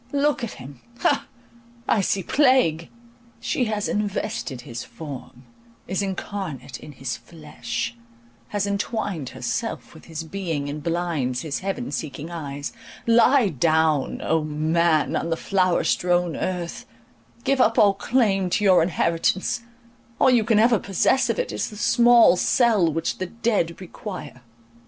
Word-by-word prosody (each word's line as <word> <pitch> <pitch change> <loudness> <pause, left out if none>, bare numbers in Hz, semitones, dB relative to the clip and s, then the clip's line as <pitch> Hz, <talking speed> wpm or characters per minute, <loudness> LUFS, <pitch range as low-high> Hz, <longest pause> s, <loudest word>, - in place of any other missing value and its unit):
Look 285 -2 +1
at 235 - -3
him—ha! 140 - -3 0.6
I 210 - +3
see 195 0 0
plague! 255 - +3 0.5
She 250 - 0
has 215 -2 -1
invested 205 - -2
his 120 -1 -7
form, 135 -4 -9 0.4
is 190 +2 -1
incarnate 190 - -5
in 150 - -11
his 130 -1 -4
flesh, 120 -7 -6 0.5
has 205 +6 -1
entwined 200 - -2
herself - - -4
with - - -15
his 160 0 -6
being, 165 -4 -3
and 150 +1 -5
blinds 165 -7 -1
his 155 -4 -3
heaven 195 +6 -3
seeking 155 +1 -5
eyes. 145 -4 -5 0.3
Lie 235 0 +5
down, 155 -1 +1
O 160 -1 +1
man, 155 +1 +1
on 165 - -1
the 165 - 0
flower 185 -2 +1
strown 175 -2 +1
earth; 180 -2 -4 0.6
give 270 -1 +2
up 230 -1 +3
all 200 -2 +6
claim 195 -4 +1
to 210 - 0
your 190 -4 +6
inheritance, 170 +7 0 0.6
all 260 - +5
you 240 -3 +4
can 225 -1 +2
ever 230 0 +5
possess 200 +7 +2
of - - 0
it - - -2
is - - -2
the 210 - -11
small 235 -2 +6
cell 215 - +3
which 165 +1 -2
the 185 - -2
dead 205 -6 -1
require. 180 - -8
180 Hz, 140 wpm, -23 LUFS, 155-215 Hz, 0.6 s, all